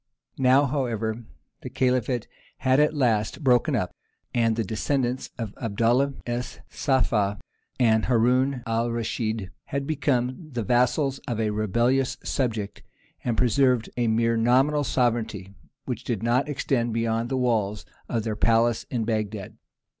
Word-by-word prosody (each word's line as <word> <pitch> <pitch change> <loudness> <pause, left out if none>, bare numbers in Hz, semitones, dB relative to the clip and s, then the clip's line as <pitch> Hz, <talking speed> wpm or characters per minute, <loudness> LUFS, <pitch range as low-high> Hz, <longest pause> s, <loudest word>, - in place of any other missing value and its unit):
Now, 135 +2 +5
however, 120 -5 -2 0.4
the - - -6
Caliphate 125 -2 0 0.3
had 130 +1 +2
at 150 +1 +3
last 120 0 0
broken 125 -3 +3
up, - - -1 0.4
and 115 -2 +2
the 115 - 0
descendants 125 +4 -1
of 110 -4 -5
Abdallah 120 +5 +1
es 120 +1 -4
Saffah 105 -7 +1 0.4
and 110 -3 +3
Haroun 125 +2 +2
al 115 +1 0
Raschid 110 -3 -2
had 140 0 -3
become 140 0 -1
the 120 -2 -2
vassals 125 +5 +2
of 120 -4 -2
a 110 -1 +1
rebellious 120 +5 +1
subject, 110 -6 -2 0.4
and 115 -2 -1
preserved 125 -1 +2
a 120 -1 0
mere 115 +1 +2
nominal 130 +6 +3
sovereignty 115 -7 -1 0.3
which 125 -2 -4
did 115 -4 -3
not 125 +5 +1
extend 120 -5 0
beyond 115 0 0
the 135 - -1
walls 110 -5 0 0.2
of 115 -2 -1
their 110 -1 -2
palace 115 +1 +2
in 115 -3 -1
Bagdad. 105 -3 -3
120 Hz, 140 wpm, -25 LUFS, 110-130 Hz, 0.4 s, Now